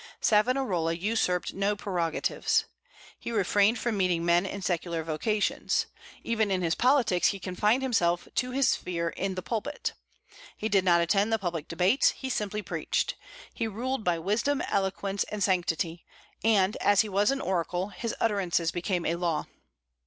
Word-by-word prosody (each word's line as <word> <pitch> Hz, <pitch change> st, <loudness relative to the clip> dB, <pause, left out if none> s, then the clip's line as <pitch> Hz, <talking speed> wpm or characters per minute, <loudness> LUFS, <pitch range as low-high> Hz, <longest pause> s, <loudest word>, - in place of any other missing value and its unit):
Savonarola 210 Hz, -7 st, +2 dB
usurped 180 Hz, -1 st, 0 dB
no 200 Hz, +2 st, 0 dB
prerogatives. 175 Hz, -5 st, 0 dB, 0.5 s
He -, -, -5 dB
refrained 205 Hz, +1 st, +3 dB
from 235 Hz, -3 st, -1 dB
meeting 180 Hz, -3 st, +1 dB
men 175 Hz, +2 st, +3 dB
in 200 Hz, 0 st, -6 dB
secular 170 Hz, -2 st, -1 dB
vocations. 200 Hz, +7 st, 0 dB, 0.4 s
Even 220 Hz, -2 st, 0 dB
in 185 Hz, -2 st, 0 dB
his 165 Hz, -1 st, +1 dB
politics 245 Hz, -8 st, +3 dB
he 200 Hz, -, 0 dB
confined 210 Hz, +7 st, +1 dB
himself 175 Hz, -9 st, +1 dB
to 250 Hz, -, 0 dB
his 270 Hz, +1 st, +2 dB
sphere 170 Hz, -2 st, -1 dB
in 190 Hz, +2 st, -3 dB
the 185 Hz, -, -5 dB
pulpit. 240 Hz, +6 st, -3 dB, 0.6 s
He 220 Hz, -, -2 dB
did 195 Hz, -3 st, +3 dB
not 175 Hz, -2 st, +4 dB
attend 200 Hz, +5 st, +2 dB
the 225 Hz, -, +3 dB
public 175 Hz, -6 st, -4 dB
debates; 180 Hz, +10 st, +3 dB
he 265 Hz, -1 st, -4 dB
simply 210 Hz, -2 st, -2 dB
preached. -, -, -1 dB, 0.4 s
He 225 Hz, -, -2 dB
ruled 240 Hz, +3 st, -3 dB
by 175 Hz, -3 st, +1 dB
wisdom, 215 Hz, -, 0 dB
eloquence, 195 Hz, 0 st, -1 dB
and 210 Hz, -2 st, -3 dB
sanctity; 170 Hz, -3 st, 0 dB, 0.4 s
and 210 Hz, -3 st, +3 dB
as 205 Hz, -1 st, +4 dB
he 220 Hz, -, -3 dB
was 200 Hz, +1 st, +2 dB
an 275 Hz, 0 st, 0 dB
oracle, 180 Hz, -2 st, -1 dB
his 215 Hz, +4 st, -4 dB
utterances 185 Hz, -6 st, +1 dB
became 175 Hz, 0 st, -2 dB
a 170 Hz, -, 0 dB
law. 170 Hz, -4 st, -1 dB
195 Hz, 160 wpm, -28 LUFS, 175-220 Hz, 0.6 s, not